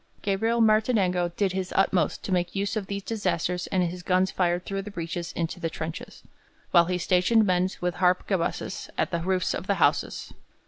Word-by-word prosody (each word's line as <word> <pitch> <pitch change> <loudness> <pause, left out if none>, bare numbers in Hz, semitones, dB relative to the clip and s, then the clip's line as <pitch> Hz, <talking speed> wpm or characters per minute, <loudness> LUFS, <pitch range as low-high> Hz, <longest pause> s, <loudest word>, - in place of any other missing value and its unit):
Gabriel 225 +4 +1
Martinengo 215 -5 +3
did 200 -2 +1
his 185 0 -3
utmost 190 -1 +1
to - - -5
make 175 0 0
use 200 +2 -1
of 205 -3 -3
these 200 0 -4
disasters 180 -5 -1
and 185 -1 +1
his 175 +1 -3
guns 185 +1 +2
fired 175 -1 0
through 195 0 -3
the 205 - -8
breaches 170 -2 -5
into 165 +1 -3
the 165 -2 -2
trenches, 160 0 -7 0.5
while 170 -2 +6
he 180 +1 -1
stationed 185 +5 +3
men 185 -1 +2
with 180 -1 -1
harquebuses 180 0 0
on - - +2
the 170 - 0
roofs 185 +1 0
of - - -5
the - - +2
houses. - - 0
185 Hz, 185 wpm, -26 LUFS, 175-195 Hz, 0.5 s, while